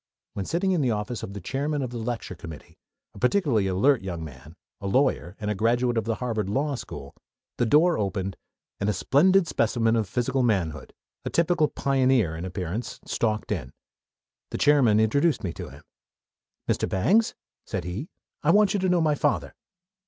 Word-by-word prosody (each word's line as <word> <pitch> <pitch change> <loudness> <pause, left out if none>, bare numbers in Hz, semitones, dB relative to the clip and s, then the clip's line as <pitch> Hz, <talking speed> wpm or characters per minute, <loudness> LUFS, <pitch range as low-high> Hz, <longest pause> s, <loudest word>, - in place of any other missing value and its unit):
When 100 - -4
sitting 185 +3 0
in 175 -4 +2
the 130 - +2
office 105 +1 -2
of 100 - -6
the 100 - -6
chairman 140 - -2
of 125 - -4
the 120 - -5
lecture 115 -3 -4
committee, 80 -3 -11 0.3
a - - -12
particularly 125 - +2
alert 110 +9 +3
young 90 -4 -5
man, 75 +1 -11 0.2
a 100 - -5
lawyer, 100 -5 +1
and 105 -1 -2
a - - +1
graduate 120 +4 +1
of 115 -2 0
the 115 -1 0
Harvard 110 -5 -2
Law 140 +7 0
School, 75 - -7 0.4
the 120 - +1
door 160 +7 +4
opened, 95 -2 -2 0.4
and 100 - 0
a - - +2
splendid 170 - +4
specimen 115 -6 +1
of 110 -4 0
physical 130 +2 0
manhood, 95 -10 0 0.3
a - - -3
typical 170 -2 +2
pioneer 130 - +1
in 85 +3 -5
appearance, 95 +5 -4
stalked 110 -2 -1
in. 70 -10 -3 0.8
The - - -4
chairman 135 -8 +4
introduced 140 +9 +2
me 90 -3 -2
to - - -7
him. - - -14 0.8
"Mr. - - 0
Bangs," 205 - +2 0.3
said - - -3
he, 95 - -5 0.3
"I 150 - 0
want 205 +3 +5
you 205 - +1
to 185 0 +1
know 180 -1 +3
my 155 -2 +3
father." 145 0 0
115 Hz, 180 wpm, -26 LUFS, 95-145 Hz, 0.8 s, want